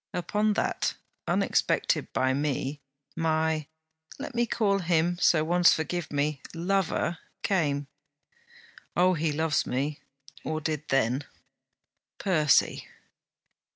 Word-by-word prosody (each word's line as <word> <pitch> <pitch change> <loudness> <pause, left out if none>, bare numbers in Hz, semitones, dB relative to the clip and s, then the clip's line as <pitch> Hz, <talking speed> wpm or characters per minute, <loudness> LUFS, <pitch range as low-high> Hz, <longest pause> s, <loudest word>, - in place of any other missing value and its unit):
Upon 210 +4 +1
that; - - -1 0.3
unexpected - - +1
by 130 0 +1
me, 145 0 -2 0.3
my 160 -2 0 0.5
let 285 0 -6
me 240 0 +1
call 205 -4 +1
him 175 0 +1
so 155 -4 +4
once, 175 +2 +5
forgive 160 0 -3
me! 145 0 -1
lover 175 -1 0 0.2
came. 145 -7 +1 1.1
Oh! 180 +1 +5
he 160 -2 0
loves 155 0 0
me, 140 +3 -2 0.4
or 155 0 -2
did 155 -1 -3
then. 135 +1 +1 0.9
Percy! 155 -7 +2
160 Hz, 105 wpm, -28 LUFS, 145-180 Hz, 1.1 s, once